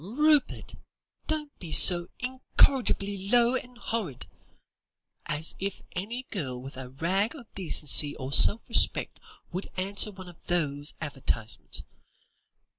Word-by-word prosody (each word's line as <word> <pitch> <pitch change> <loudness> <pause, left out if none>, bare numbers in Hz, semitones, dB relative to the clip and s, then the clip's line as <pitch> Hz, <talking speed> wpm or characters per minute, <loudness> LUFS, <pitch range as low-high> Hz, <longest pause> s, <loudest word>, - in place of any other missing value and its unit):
"Rupert! 295 - +1 0.5
don't 300 -2 -4
be 170 -3 -7
so 175 +1 +6
incorrigibly 245 -6 +1
low 240 +1 +4
and 250 -1 -5
horrid. 205 - -3 1.0
As 150 +2 0
if 195 0 -5
any 230 +8 -5
girl 130 - -4
with 135 +2 -10
a 130 -1 -8
rag 185 - -1
of 240 -7 -14
decency 150 -5 +2
or 130 +1 -6
self 215 - +5
respect - - +2 0.3
would 185 +3 -5
answer 200 +3 0
one 190 -2 -12
of 175 -2 -15
those 145 -4 -1
advertisements. 130 -7 -3
190 Hz, 120 wpm, -27 LUFS, 150-235 Hz, 1.0 s, so